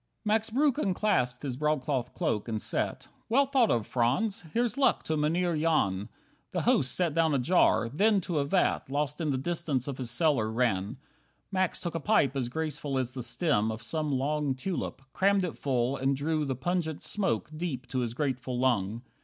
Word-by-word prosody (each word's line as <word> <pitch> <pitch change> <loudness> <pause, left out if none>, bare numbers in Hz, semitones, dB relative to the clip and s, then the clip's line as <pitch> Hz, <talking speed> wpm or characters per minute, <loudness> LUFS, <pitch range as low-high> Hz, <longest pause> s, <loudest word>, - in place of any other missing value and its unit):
5 - - -44
Max 220 +1 +2
Breuck 275 +4 +2
unclasped 180 - 0
his 135 -4 -2
broadcloth 135 -3 -1
cloak, 105 +1 -1
and 110 -2 -2
sat. - - -2 0.2
"Well 275 +5 +4
thought 265 -4 +3
of, 115 -3 +1
Franz; 135 - +1
here's 235 +3 0
luck 275 -1 +2
to 160 - -1
Mynheer 165 +3 +1
Jan." 120 -11 +1 0.4
The - - 0
host 130 - +2
set 175 -4 +1
down 160 -2 +2
a - - +3
jar; 125 -5 +3
then 200 - +3
to 165 -3 -1
a 140 - +1
vat 180 -3 +1
Lost 145 +2 -1
in 155 - 0
the 135 - +1
distance 150 -3 -1
of 135 -2 -5
his 125 -3 -4
cellar, 120 -4 +1
ran. 110 -1 0 0.5
Max 185 -2 +1
took 175 - -4
a 165 - -2
pipe 150 -6 +2
as 125 -3 -1
graceful 150 -1 -3
as 130 -1 -1
the 130 - -6
stem 120 -3 0
Of 110 +1 -6
some 155 +4 -2
long 140 +1 0
tulip, 140 -1 -4
crammed 200 0 +3
it 170 - -5
full, 130 -1 0
and 135 +1 +1
drew 155 +1 0
The 135 -2 -2
pungent 160 +2 -2
smoke 195 -6 -1
deep 155 -6 -3
to 130 - -1
his 120 -2 -2
grateful 130 -3 -2
lung. 120 -3 0
145 Hz, 195 wpm, -29 LUFS, 125-175 Hz, 0.5 s, Well